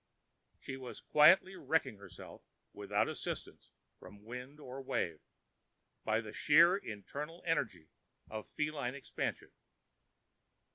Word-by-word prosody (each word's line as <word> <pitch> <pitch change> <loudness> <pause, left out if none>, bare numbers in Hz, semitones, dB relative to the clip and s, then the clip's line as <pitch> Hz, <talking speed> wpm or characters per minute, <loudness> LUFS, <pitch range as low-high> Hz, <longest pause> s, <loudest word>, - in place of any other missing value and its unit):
She 135 - -6
was 130 -2 -8
quietly 185 +5 +6
wrecking 135 - 0
herself 100 -2 -11 0.3
without - - 0
assistance - - -5 0.3
from 100 0 -13
wind 125 +5 -8
or 135 -1 -7
wave, 85 - -1 0.8
by 110 +1 +1
the 110 -2 -9
sheer 170 +5 +6
internal 150 - -6
energy 110 - -1 0.4
of 110 0 -7
feline 150 -4 -2
expansion. 140 - -4
135 Hz, 105 wpm, -35 LUFS, 110-150 Hz, 0.8 s, quietly